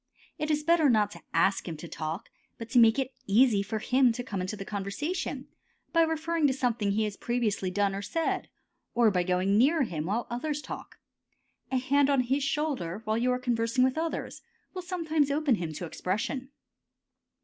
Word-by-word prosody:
It 305 Hz, -, -2 dB
is 300 Hz, -1 st, +1 dB
better 325 Hz, -2 st, +4 dB
not 210 Hz, -3 st, +3 dB
to -, -, -11 dB
ask 195 Hz, 0 st, +2 dB
him 160 Hz, -, -5 dB
to 170 Hz, -, -8 dB
talk, 160 Hz, +4 st, -5 dB, 0.3 s
but 230 Hz, -1 st, -8 dB
to 245 Hz, -, +5 dB
make 225 Hz, 0 st, +6 dB
it 265 Hz, -1 st, -1 dB
easy 215 Hz, 0 st, +4 dB
for 200 Hz, +2 st, -3 dB
him 250 Hz, +3 st, +3 dB
to 245 Hz, -, -4 dB
come 200 Hz, -6 st, -4 dB
into 185 Hz, +3 st, -3 dB
the 195 Hz, -, -6 dB
conversation 205 Hz, -, -3 dB, 0.5 s
by 330 Hz, -, +5 dB
referring 320 Hz, -1 st, +1 dB
to 265 Hz, -, +1 dB
something 245 Hz, -6 st, 0 dB
he 220 Hz, +2 st, +1 dB
has 210 Hz, -1 st, -3 dB
previously 225 Hz, -6 st, -1 dB
done 200 Hz, +1 st, +1 dB
or 195 Hz, -, -3 dB
said, 325 Hz, +10 st, -2 dB, 0.5 s
or 235 Hz, -2 st, +5 dB
by 180 Hz, -2 st, +1 dB
going 185 Hz, +3 st, +2 dB
near 295 Hz, +5 st, +4 dB
him 165 Hz, -8 st, -3 dB
while 220 Hz, +5 st, -1 dB
others 290 Hz, +5 st, -3 dB
talk. -, -, -8 dB, 0.7 s
A 260 Hz, -, +2 dB
hand 275 Hz, +2 st, +2 dB
on 275 Hz, -2 st, +4 dB
his 265 Hz, +3 st, 0 dB
shoulder 270 Hz, -, -2 dB
while 215 Hz, +1 st, 0 dB
you 250 Hz, +1 st, +2 dB
are 250 Hz, -, +1 dB
conversing 240 Hz, 0 st, +1 dB
with 260 Hz, 0 st, +2 dB
others, 325 Hz, 0 st, -3 dB, 0.3 s
will 370 Hz, -, -4 dB
sometimes 325 Hz, -5 st, 0 dB
open 290 Hz, -1 st, +2 dB
him 175 Hz, -7 st, -2 dB
to 175 Hz, -, -5 dB
expression. 220 Hz, -, -3 dB
245 Hz, 195 wpm, -28 LUFS, 200-285 Hz, 0.7 s, make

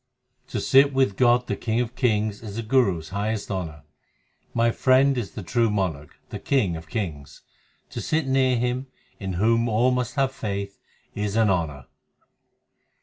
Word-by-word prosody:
To -, -, -3 dB
sit 135 Hz, +1 st, +4 dB
with 130 Hz, -7 st, +2 dB
God 125 Hz, +2 st, +3 dB
the -, -, -2 dB
King 115 Hz, 0 st, -1 dB
of 120 Hz, 0 st, -2 dB
kings 110 Hz, -5 st, 0 dB
is 105 Hz, -3 st, -8 dB
the 115 Hz, -, -3 dB
Guru 110 Hz, -6 st, +2 dB
s 80 Hz, -1 st, -9 dB
highest 105 Hz, +2 st, -3 dB
honour: 80 Hz, -7 st, -4 dB, 0.7 s
My 115 Hz, 0 st, +2 dB
Friend 135 Hz, +3 st, +3 dB
is 120 Hz, -6 st, -4 dB
the 105 Hz, -, -5 dB
true 115 Hz, +5 st, +1 dB
monarch, 90 Hz, -8 st, -2 dB, 0.2 s
the -, -, -5 dB
King 110 Hz, -11 st, +1 dB
of 80 Hz, 0 st, -9 dB
kings; 75 Hz, -, -5 dB, 0.5 s
To -, -, -5 dB
sit 160 Hz, -1 st, 0 dB
near 130 Hz, -1 st, +2 dB
Him, 125 Hz, +2 st, -1 dB, 0.3 s
in 95 Hz, -3 st, -4 dB
whom 115 Hz, +5 st, +2 dB
all 115 Hz, +4 st, +3 dB
must 125 Hz, 0 st, -2 dB
have 135 Hz, -2 st, +1 dB
faith, 100 Hz, -5 st, -5 dB, 0.3 s
is 105 Hz, 0 st, -3 dB
an 110 Hz, -3 st, +4 dB
honour. 75 Hz, -7 st, -2 dB
110 Hz, 170 wpm, -24 LUFS, 95-125 Hz, 0.7 s, sit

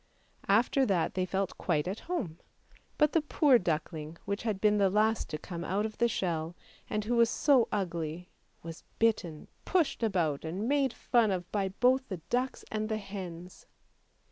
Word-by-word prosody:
" -, -, -26 dB
After 265 Hz, +3 st, +1 dB
that 180 Hz, -5 st, +1 dB
thev 185 Hz, -1 st, -1 dB
felt 195 Hz, 0 st, -2 dB
quite 155 Hz, -3 st, 0 dB
at 195 Hz, +4 st, -3 dB
home. 200 Hz, -, -3 dB, 0.6 s
But 300 Hz, -1 st, +4 dB
the 330 Hz, -, +4 dB
poor 295 Hz, -4 st, +4 dB
duckling 160 Hz, -2 st, -3 dB
which 200 Hz, +1 st, -2 dB
had 215 Hz, -4 st, -2 dB
been 210 Hz, 0 st, +3 dB
the 195 Hz, -1 st, +4 dB
last 215 Hz, +3 st, +1 dB
to 155 Hz, -, -3 dB
come 170 Hz, +2 st, -7 dB
out 195 Hz, +5 st, 0 dB
of 215 Hz, -, -6 dB
the 235 Hz, -, +4 dB
shell, 170 Hz, -6 st, -2 dB, 0.3 s
and 210 Hz, -1 st, -2 dB
who 240 Hz, +2 st, 0 dB
was 235 Hz, -1 st, +5 dB
so 270 Hz, -4 st, +3 dB
ugly, 170 Hz, -3 st, -3 dB, 0.3 s
was 165 Hz, -1 st, -8 dB
bitten, 185 Hz, -9 st, 0 dB, 0.2 s
pushed 350 Hz, -9 st, +1 dB
about, 175 Hz, -10 st, 0 dB
and 180 Hz, +7 st, -3 dB
made 275 Hz, -1 st, +2 dB
fun 235 Hz, -2 st, +2 dB
of 185 Hz, -2 st, -1 dB
both 215 Hz, +6 st, +2 dB
by 190 Hz, -, -2 dB
the 170 Hz, -, -13 dB
ducks 250 Hz, +2 st, -1 dB
and 215 Hz, 0 st, -2 dB
the 220 Hz, -, 0 dB
hens. 185 Hz, -4 st, -8 dB
200 Hz, 180 wpm, -30 LUFS, 175-230 Hz, 0.6 s, was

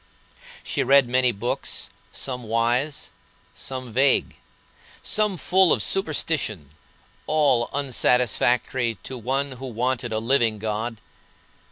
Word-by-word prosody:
She -, -, -2 dB
read 140 Hz, -2 st, +5 dB
many 125 Hz, 0 st, +2 dB
books, 115 Hz, +3 st, -4 dB, 0.2 s
some 125 Hz, -2 st, -4 dB
wise, 120 Hz, +6 st, 0 dB, 0.4 s
some 130 Hz, -2 st, -7 dB
vague, 135 Hz, +3 st, +2 dB, 0.7 s
some 210 Hz, -3 st, 0 dB
full 185 Hz, 0 st, +3 dB
of 110 Hz, -, +2 dB
superstition, 145 Hz, -, -1 dB, 0.6 s
all 145 Hz, -6 st, +2 dB
unsatisfactory 125 Hz, -3 st, +1 dB
to 130 Hz, -, -6 dB
one 135 Hz, +4 st, -2 dB
who 130 Hz, +1 st, -7 dB
wanted 120 Hz, 0 st, -1 dB
a 110 Hz, -, -1 dB
living 115 Hz, -1 st, +2 dB
God. 110 Hz, +2 st, -3 dB
125 Hz, 110 wpm, -24 LUFS, 115-140 Hz, 0.7 s, read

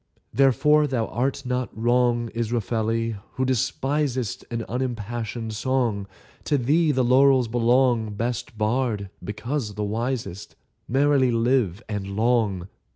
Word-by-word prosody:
Therefore 140 Hz, +4 st, +4 dB
thou 125 Hz, -5 st, 0 dB
art 130 Hz, +3 st, -2 dB
not 125 Hz, 0 st, -1 dB
wrong, 120 Hz, 0 st, +2 dB
Israfeli, 115 Hz, -1 st, -1 dB, 0.2 s
who 130 Hz, -, -1 dB
despisest 130 Hz, 0 st, -1 dB
An 115 Hz, -2 st, -3 dB
unimpassioned 120 Hz, -2 st, -3 dB
song; 115 Hz, -4 st, 0 dB, 0.4 s
To 145 Hz, -, +2 dB
thee 150 Hz, +5 st, +2 dB
the 130 Hz, -2 st, +1 dB
laurels 130 Hz, 0 st, +5 dB
belong, 120 Hz, -2 st, +2 dB
Best 120 Hz, +1 st, -3 dB
bard, 110 Hz, -3 st, -1 dB
because 105 Hz, +1 st, -4 dB
the 105 Hz, -, -2 dB
wisest: 110 Hz, -2 st, -3 dB, 0.3 s
Merrily 135 Hz, 0 st, +3 dB
live, 115 Hz, -4 st, +1 dB
and 100 Hz, -2 st, -4 dB
long! 110 Hz, -5 st, +1 dB
120 Hz, 115 wpm, -24 LUFS, 110-130 Hz, 0.4 s, laurels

